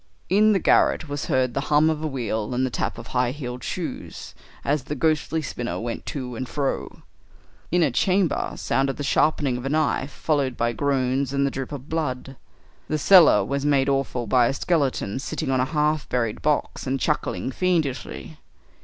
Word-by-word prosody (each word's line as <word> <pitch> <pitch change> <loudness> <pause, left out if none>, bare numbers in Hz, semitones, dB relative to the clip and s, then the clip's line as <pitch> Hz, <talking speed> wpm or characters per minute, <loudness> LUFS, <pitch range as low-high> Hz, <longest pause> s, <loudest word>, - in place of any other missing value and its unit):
In 210 +4 +5
the 205 - +3
garret 160 -2 +3
was 145 0 -4
heard 130 -2 +1
the - - -1
hum 150 +1 +5
of 160 -1 -1
a - - 0
wheel 120 -4 -3
and 130 +1 +1
the 130 - -3
tap - - -2
of - - -8
high 125 -1 +2
heeled 125 -2 -6
shoes, - - -5 0.3
as 140 -2 0
the 150 - -4
ghostly 160 0 0
spinner 120 -3 -4
went 115 0 -5
to 125 -4 -4
and 130 +2 -5
fro. 140 -2 -3 0.7
In 175 0 +3
a 145 - +2
chamber 185 +6 +1
sounded 135 0 0
the 145 - -4
sharpening 140 -2 +2
of 125 - -7
a - - -1
knife, 150 -2 0
followed 140 -4 -1
by 120 0 0
groans 135 0 0
and 140 0 +2
the 140 - 0
drip 135 +1 -5
of 140 -1 -7
blood. 135 -5 -3 0.5
The 155 - 0
cellar 155 - +6
was 140 +4 -2
made 140 -2 +2
awful 135 -3 -1
by 120 +2 +4
a - - 0
skeleton 140 - 0
sitting 155 0 -3
on 130 - +2
a 125 - +2
half 150 0 0
buried 115 -4 -1
box 150 -2 -1
and 135 +1 0
chuckling 150 -3 -1
fiendishly. 160 -2 -2
140 Hz, 190 wpm, -24 LUFS, 125-155 Hz, 0.7 s, cellar